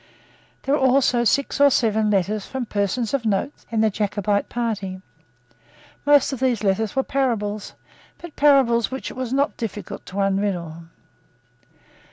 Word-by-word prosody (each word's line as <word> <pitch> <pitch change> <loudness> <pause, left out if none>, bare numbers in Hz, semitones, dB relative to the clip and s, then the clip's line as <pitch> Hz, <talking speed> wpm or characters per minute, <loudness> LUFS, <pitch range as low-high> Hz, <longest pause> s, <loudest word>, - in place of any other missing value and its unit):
There 275 - 0
were 295 - +1
also 255 -2 +3
six 280 +4 +1
or 285 - +8
seven 220 -5 +1
letters 205 +1 0
from 260 -2 -4
persons 210 +3 -1
of 275 -3 0
note 220 +6 0 0.2
in 225 -1 0
the 220 -1 +3
Jacobite 205 0 -1
party. 210 -6 -3 1.1
Most 290 -1 +5
of 265 - -5
these 250 -4 0
letters 205 +3 0
were 265 - +2
parables, 215 -7 -2 0.4
but 345 -3 -11
parables 265 -5 +4
which 265 0 -5
it - - -11
was 255 -2 -4
not 275 +2 0
difficult 215 -3 -6
to 185 - -10
unriddle. 190 -5 -1
225 Hz, 150 wpm, -22 LUFS, 205-265 Hz, 1.1 s, or